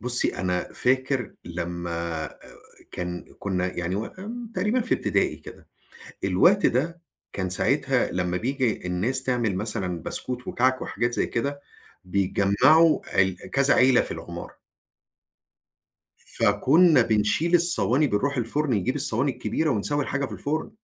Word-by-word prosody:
بُصّي 125 0 +1
أنا 90 -1 -2
فاكر 130 0 0
لمّا 85 -1 -4
آآ - - -14 0.5
كان 90 0 -6
كنا 90 -2 -1
يعني 90 +2 -2
و 110 +2 -3 0.5
تقريبًا 210 +7 +1
في 230 - +2
ابتدائي - - 0
كده، - - -13 0.6
الوقت 175 - +4
ده 165 +7 -1 0.3
كان 95 -2 -3
ساعتها 90 - +1
لمّا 90 0 -1
بييجي 125 -3 -1
الناس 115 +9 -1
تعمل 120 -7 0
مثلًا 95 -5 -3
بسكوت 125 -1 -4
وكعك 130 +1 +1
وحاجات 120 +3 -2
زي - - 0
كده، 140 +4 -3 0.4
بيتجمّعوا 100 - +3
ال 95 -1 -4
كذا 135 0 +3
عيلة 130 -1 +5
في - - -2
العمارة. 85 +1 -9 1.7
فكُنا 140 - +4
بنشيل 115 +11 +1
الصواني 155 -5 +3
بنروح 140 +5 0
الفرن 135 +5 -1
نجيب 115 +8 -1
الصواني 135 -1 0
الكبيرة 160 +4 -1
ونسوي 145 +6 0
الحاجة 140 0 -2
في 115 - -9
الفرن. 150 +8 -3
120 Hz, 130 wpm, -25 LUFS, 90-140 Hz, 1.7 s, عيلة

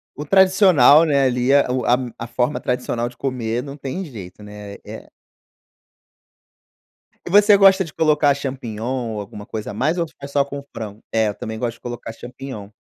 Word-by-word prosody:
O 150 - -7
tradicional, 185 -5 +6
né, 140 -4 +2
ali, 125 0 +1
eh, 140 0 +5
o 125 0 -1
a 120 - +4 0.2
a 115 - -5
forma 125 +4 -1
tradicional 120 -1 -2
de 125 - -17
comer, 120 -3 -3
não 140 +1 -9
tem 140 +8 -5
jeito, 105 - -10
né, 105 -1 -10
é - - -10 2.2
E - - -7
você 205 +2 +6
gosta 195 -1 +5
de 160 - -11
colocar 150 -2 +3
champignon, 125 -3 -4
ou 105 - -4
alguma 105 0 -9
coisa 110 -1 -6
a - - -8
mais 150 +10 0
ou 170 - 0 0.2
é 140 - -6
só 140 0 +1
com 140 0 -8
frango? 110 -2 -7
É, 110 -1 +2
eu 105 - -3
também 110 +1 -6
gosto 115 +1 -3
de - - -22
colocar 120 -2 -7
champignon. 125 -3 -9
130 Hz, 185 wpm, -20 LUFS, 115-145 Hz, 2.2 s, tradicional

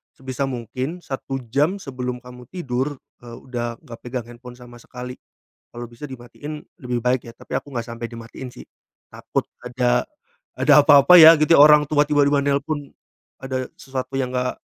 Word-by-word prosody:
sebisa 130 +1 -4
mungkin 130 - -5
1 135 0 -4 0.2
jam 150 +7 +2
sebelum 125 -7 -5
kamu 125 -1 -13
tidur, 140 -5 -3 0.3
eee, 120 -1 -10
udah 120 -2 -5
nggak 115 -1 -11
pegang 125 -1 -5
handphone 120 +1 -12
sama 120 -1 -14
sekali, 125 +1 -9 0.5
kalau 120 0 -7
bisa 120 +3 -15
dimatiin 135 +3 -9 0.2
lebih 125 -1 -2
baik 125 +1 +1
ya, 115 - -9
tapi - - -8
aku 145 - -8
nggak 120 -1 -4
sampai 115 0 -6
dimatiin 115 +2 -9
sih, - - -13 0.4
takut - - -4 0.2
ada 125 0 +1 0.5
ada 145 +2 +5
apa-apa 145 +4 +8
ya 165 -1 +11
gitu. 160 +2 +5
Orang 150 0 +7
tua 150 -1 +3
tiba-tiba 145 -1 +3
nelpon, 145 0 -2 0.5
ada 130 -1 -3
sesuatu 130 0 -6
yang 130 -1 -1
enggak, 125 0 -3
130 Hz, 165 wpm, -22 LUFS, 125-145 Hz, 0.5 s, ya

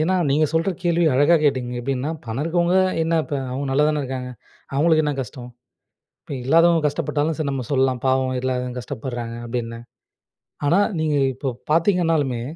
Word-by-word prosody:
ஏன்னா 185 +4 +2
நீங்க 150 +3 +3
சொல்ற 165 +4 +1
கேள்விய 170 -2 +2
அழகா 145 +6 +5
கேட்டீங்க. 130 -4 +1
எப்படின்னா 135 +3 -2
பணம் 115 +4 -3
இருக்கிறவங்க 170 +2 +1 0.3
என்ன 165 +1 0
இப்ப, - - -5 0.2
அவங்க 140 +2 -3
நல்லாதான 150 +2 +2
இருக்காங்க. 130 -1 -5 0.4
அவங்களுக்கு 155 +2 +3
என்ன 150 -1 0
கஷ்டம்? 125 -1 -10 0.7
இப்போ - - -10
இல்லாதவங்க 165 +4 +4
கஷ்டப்பட்டாலும் 150 +1 -1
சரி 155 -3 -1
நம்ம 135 -2 -3
சொல்லலாம். 130 -2 +2
பாவம் 130 0 +1
இல்லாதவங்க 125 -1 -2
கஷ்டப்படுறாங்க, 120 +1 -5
அப்படின்னு. 115 -1 -4 0.9
ஆனா, 170 +7 +4 0.2
நீங்க 155 -1 +1 0.2
இப்போ 130 +2 -3 0.2
பார்த்தீங்கன்னாலுமே, 165 - +2
140 Hz, 150 wpm, -22 LUFS, 130-160 Hz, 0.9 s, அழகா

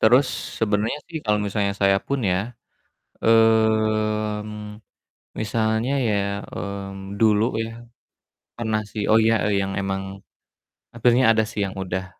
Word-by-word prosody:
terus 125 +5 +5 0.3
sebenarnya 110 +5 0
sih 160 - -3
kalau 105 -1 +2
misalnya 100 0 -1
saya 100 0 +4
pun 140 - -1
ya, 90 - +2 0.8
mmm, 110 -1 +1 0.6
misalnya 110 +3 0 0.2
ya, 105 - +1 0.3
mmm, 100 0 -6
dulu 110 -1 +4 0.2
ya, 115 - -5 0.9
pernah 110 -2 -1
sih, 105 - -3
oh 110 - +6
iya, 115 0 +4
eee, 100 -2 +1
yang 95 0 -2
emang 95 0 -2 0.9
hampirnya 120 +2 +3
ada 110 -1 +4
sih 105 - -4
yang 95 - -7
udah 95 0 -3
110 Hz, 130 wpm, -23 LUFS, 100-110 Hz, 0.9 s, oh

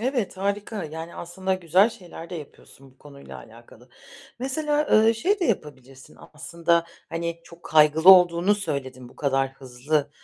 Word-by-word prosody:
Evet, 240 -6 -2
harika. 200 +1 -3
Yani, 160 +2 -8
aslında 190 +2 -3
güzel 185 +4 +2
şeyler 175 -5 -12
de 180 - -6
yapıyorsun 135 -3 -13
bu 130 - -29
konuyla 140 -1 -13
alakalı. 115 +2 -17 0.5
Mesela, 295 +3 -1
ııı, 220 +1 +5
şey 390 - 0
de - - +1
yapabilirsin, 135 - -5 0.2
aslında, 170 +2 0 0.2
hani, 170 0 -4
çok 170 0 -16
kaygılı 155 +3 +5
olduğunu 180 +1 +5
söyledin. 130 -10 -5
Bu - - -20
kadar 135 -2 -1
hızlı, 140 +3 -3
170 Hz, 145 wpm, -24 LUFS, 140-200 Hz, 0.5 s, ııı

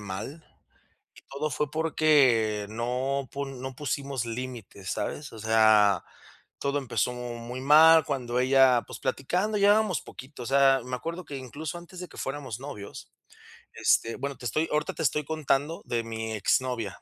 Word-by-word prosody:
mal. 105 +11 -7 0.7
Y - - -16
todo 150 +3 -3
fue 150 +2 -1
porque 140 -10 +3
no 125 +4 -2
pun 135 -2 -5
no 130 0 -6
pusimos 140 -2 -3
límites, 115 -5 -6
¿sabes? 135 +7 -4
O 115 - -10
sea, 110 -3 +4 0.5
todo 140 +1 -1
empezó 125 -2 -1
muy 120 0 -6
mal, 155 +3 +7
cuando 125 -3 -2
ella, 130 -1 +5
pues, - - -8
platicando, 180 +11 -1
llevábamos 205 -4 +3
poquito, 130 -1 -10
o - - -7
sea, 135 0 +4
me 125 0 -3
acuerdo 170 +7 -6
que 145 -2 -7
incluso 145 +5 -6
antes 175 +1 -11
de 180 - -7
que - - -15
fuéramos 135 -4 -5
novios, 120 -8 -9 0.6
este, 115 - +2
bueno, 140 +1 -4
te 125 - -11
estoy 155 +8 0
ahorita 150 0 0
te - - -6
estoy 150 0 +1
contando 155 0 -1
de 120 -1 -1
mi 110 -1 -5
exnovia, 115 -1 -1
135 Hz, 160 wpm, -27 LUFS, 120-150 Hz, 0.7 s, mal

